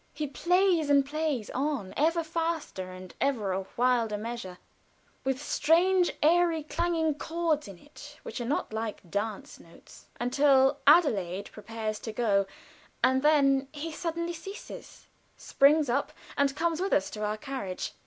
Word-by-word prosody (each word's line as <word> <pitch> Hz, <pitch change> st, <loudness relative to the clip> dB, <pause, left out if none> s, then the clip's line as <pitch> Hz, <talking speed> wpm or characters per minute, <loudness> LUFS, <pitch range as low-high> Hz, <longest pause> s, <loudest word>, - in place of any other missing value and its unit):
He 300 Hz, +1 st, -2 dB
plays 345 Hz, +3 st, +2 dB
and 280 Hz, -1 st, +5 dB
plays 295 Hz, -6 st, -2 dB
on, 270 Hz, -7 st, -2 dB
ever 330 Hz, +3 st, +2 dB
faster, 325 Hz, -, -3 dB
and 185 Hz, 0 st, -10 dB
ever 235 Hz, -8 st, 0 dB
a 190 Hz, 0 st, -3 dB
wilder 235 Hz, -3 st, +2 dB
measure, 215 Hz, -4 st, -6 dB, 0.7 s
with 265 Hz, -1 st, -1 dB
strange 350 Hz, +5 st, +3 dB
eerie 335 Hz, 0 st, +3 dB
clanging 325 Hz, 0 st, 0 dB
chords 320 Hz, 0 st, -1 dB
in 195 Hz, -3 st, -10 dB
it 290 Hz, -, -14 dB
which -, -, -6 dB
are -, -, -3 dB
not 270 Hz, -4 st, -2 dB
like 220 Hz, -4 st, -4 dB
dance 205 Hz, 0 st, -4 dB
notes, 165 Hz, -, -17 dB
until 270 Hz, +2 st, +3 dB
Adelaide 200 Hz, -, +3 dB
prepares 215 Hz, 0 st, -5 dB
to 220 Hz, -, -6 dB
go, 205 Hz, -4 st, +1 dB, 0.6 s
and 260 Hz, +1 st, +4 dB
then 275 Hz, -2 st, +3 dB
he 310 Hz, +2 st, -5 dB
suddenly 335 Hz, +1 st, -3 dB
ceases, 390 Hz, +5 st, -10 dB, 0.3 s
springs 295 Hz, +2 st, +3 dB
up, 255 Hz, +4 st, 0 dB, 0.2 s
and 280 Hz, -1 st, +1 dB
comes 330 Hz, +1 st, 0 dB
with 390 Hz, -, 0 dB
us 190 Hz, -, +1 dB
to 215 Hz, -, -5 dB
our 210 Hz, +1 st, -1 dB
carriage. 215 Hz, -7 st, -5 dB
280 Hz, 145 wpm, -28 LUFS, 220-320 Hz, 0.7 s, and